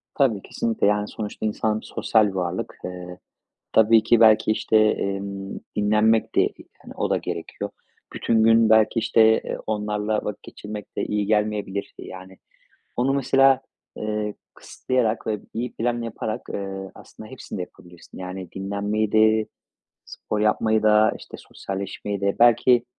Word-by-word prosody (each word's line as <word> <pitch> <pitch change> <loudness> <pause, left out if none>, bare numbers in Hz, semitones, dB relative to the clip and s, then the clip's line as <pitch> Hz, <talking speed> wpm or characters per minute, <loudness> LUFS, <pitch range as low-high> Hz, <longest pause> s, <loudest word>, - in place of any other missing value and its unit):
Tabii. 120 -8 +2
Kesinlikle. 115 -1 -1
Yani, 105 0 +1
sonuçta 105 0 -6
insan 110 0 0
sosyal 110 -2 +2
bir - - -3
varlık. 90 -1 -3
Eee, 90 0 -7 0.6
tabii 110 0 +5
ki, 120 - +4
belki, 110 -1 +5
işte, 110 0 +1
emm, 100 -2 -1 0.2
dinlenmek 110 +2 +2
de, - - +5
eee, - - -3 0.2
hani, - - -12
o - - -1
da - - +2
gerekiyor. - - -5 0.4
Bütün 110 -1 +1
gün, 115 0 +5
belki, 110 +1 +4
işte, 115 - +2 0.2
eee, - - -3
onlarla 105 0 -1
vakit 105 - -5
geçirmek 105 0 -9
de - - 0
iyi 105 -1 -1
gelmeyebilir. 105 -2 -1
E, - - -8
yani, 95 0 -11 0.6
onu 125 +3 +1
mesela, 135 0 +4 0.4
eee, 105 -1 -3 0.2
kısıtlayarak 120 -3 -2
ve 105 -2 -2
iyi 120 +2 -3
plan 120 +1 -1
yaparak, 115 0 -4
eee, 95 -1 -5
aslında 110 - -13
hepsini 130 -6 -8
de - - -2
yapabilirsin. 90 -1 -13
Yani, 90 -1 -7
dinlenmeyi 100 +2 -2
de, 110 0 +4 0.6
spor 105 - -5
yapmayı 110 +1 +2
da, 110 0 +5
işte, - - -11
sosyalleşmeyi 100 +1 -6
de. 100 0 +1
Belki, 120 +1 +5
105 Hz, 150 wpm, -23 LUFS, 100-110 Hz, 0.6 s, tabii